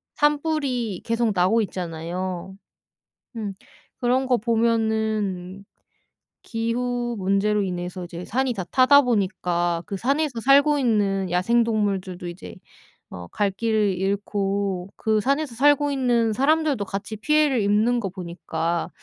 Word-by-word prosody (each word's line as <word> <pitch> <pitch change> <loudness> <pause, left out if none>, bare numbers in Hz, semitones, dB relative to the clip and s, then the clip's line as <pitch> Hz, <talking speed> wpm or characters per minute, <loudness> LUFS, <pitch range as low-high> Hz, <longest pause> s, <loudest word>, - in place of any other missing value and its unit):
산불이 285 - 0
계속 230 -1 +1
나고 185 +6 +3
있잖아요. 180 +1 -5 0.8
음 205 -3 -4 0.5
그런 255 +2 +1
거 250 -2 +3
보면은 220 -4 -1 0.8
기후 240 +1 -2
문제로 200 +2 +1
인해서 180 -1 -4
이제 175 +1 -8
산이 260 +2 0
다 190 - -4
타다 265 +7 +5
보니까 180 -7 0
그 200 - -4
산에서 275 +3 -1
살고 285 +4 +5
있는 200 -7 +1
야생 230 +7 +2
동물들도 195 -5 -2
이제 175 +2 -9 0.6
어 90 -1 -8
갈 205 -1 0
길을 215 -1 +1
잃고 195 -1 -1
그 220 -1 +1
산에서 275 +1 0
살고 290 +2 +3
있는 240 -4 +1
사람들도 285 -1 +1
같이 195 +3 -5
피해를 295 -1 +2
입는 215 +4 +2
거 195 - -3
보니까 170 -2 -3
215 Hz, 255 characters per minute, -23 LUFS, 190-245 Hz, 0.8 s, 타다